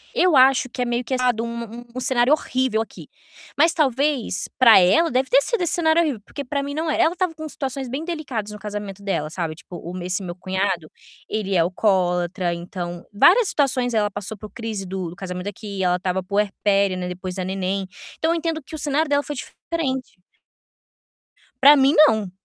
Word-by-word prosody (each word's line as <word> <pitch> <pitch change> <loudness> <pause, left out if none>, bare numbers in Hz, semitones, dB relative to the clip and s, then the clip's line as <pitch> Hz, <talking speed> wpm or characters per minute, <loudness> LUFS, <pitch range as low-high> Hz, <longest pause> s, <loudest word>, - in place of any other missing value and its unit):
eu 360 -4 +4
acho 260 0 +5
que 250 - -5
é - - +1
meio 240 0 -1
que 260 +2 -2
ado, 245 -3 +1
um 235 0 -7
um 255 - -3
cenário 255 0 +3
horrível 260 -6 0
aqui. 225 - -9 0.5
Mas 325 +3 +4
talvez, 280 - 0
pra 230 -5 +8
ela, 195 - +4
deve 260 +1 0
ter 270 +2 +5
sido 470 - -1
esse 345 - +5
cenário 325 -1 +3
horrível, 285 -10 -1
porque 285 - -7
pra 280 +2 -2
mim 285 0 -5
não 315 +2 -2
é. - - -1
Ela 330 - +3
estava 365 -2 -1
com 315 0 -6
situações 270 -2 -4
bem 275 +6 -4
delicadas 275 -11 -4
no 210 - -9
casamento 205 -1 -6
dela, 155 -6 -2
sabe, 165 -1 -4
tipo 175 +2 -11
o 175 +2 -7
esse 180 +2 -1
meu 175 -1 -6
cunhado, 185 -2 -2 0.4
ele 200 -3 -2
é - - +4
alcoólatra, 180 0 +1
então 175 0 -6
várias 380 - +5
situações 255 -4 +1
ela 210 -2 +1
passou 205 +2 -6
por 210 +1 -10
crise 220 -4 -5
do 185 -2 -4
do - - -11
casamento 180 0 -6
aqui, 200 -1 -6
ela 180 -1 +2
estava 185 0 -2
puérpera, 200 0 +1
né, 180 0 -4
depois 180 0 -6
da 185 - -3
neném, 190 +1 -2 0.3
então 320 - +1
eu - - +1
entendo 325 -1 -2
que 315 - -9
o - - -3
cenário 295 +1 +1
dela 285 0 +2
foi 295 - -5
diferente. 265 - -4 1.4
Pra 285 +2 +9
mim, 270 +1 +4
não. 215 -6 0
225 Hz, 200 wpm, -22 LUFS, 190-280 Hz, 1.4 s, Pra